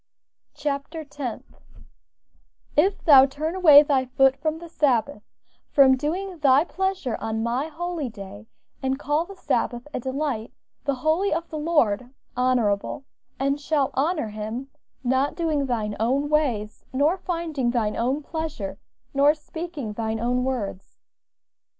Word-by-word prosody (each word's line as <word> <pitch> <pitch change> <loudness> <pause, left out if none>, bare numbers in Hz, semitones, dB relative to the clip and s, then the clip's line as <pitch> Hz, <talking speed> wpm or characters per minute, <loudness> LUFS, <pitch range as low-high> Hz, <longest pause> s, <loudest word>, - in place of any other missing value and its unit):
CHAPTER 295 +2 -3
TENTH 285 -5 -7 1.1
"If 380 +7 +2
thou 275 -4 +8
turn 305 +4 -3
away 310 -6 +8
thy 275 -3 +1
foot 265 +1 +3
from 310 +2 -2
the 340 +1 -10
Sabbath, 280 -6 +1 0.5
from 270 -2 +6
doing 345 +6 -3
thy 280 0 +5
pleasure 375 -9 -2
on 220 0 -2
my 245 +6 -1
holy 330 -3 -4
day, 205 0 -10 0.3
and 265 0 0
call 295 +3 0
the 395 - -11
Sabbath 245 -8 -1
a - - -2
Delight, 260 -3 -3 0.3
the 280 -1 +1
Holy 315 +9 +1
of 330 +1 -1
the 310 - -4
Lord, 255 -8 +1 0.2
Honorable, 250 0 0 0.3
and 275 +2 0
shalt 285 -2 +1
honor 300 -3 0
him, 220 +5 -5 0.3
not 260 +3 +1
doing 310 -5 0
thine 215 -4 -2
own 270 +6 +1
ways, 245 -9 0
nor 290 +6 +2
finding 330 -8 -2
thine 225 -3 0
own 260 +6 0
pleasure, 310 - -5 0.3
nor 285 +2 +5
speaking 310 -7 -6
thine 220 0 -2
own 245 +2 0
words." 225 -7 -4
275 Hz, 140 wpm, -24 LUFS, 240-310 Hz, 1.1 s, thou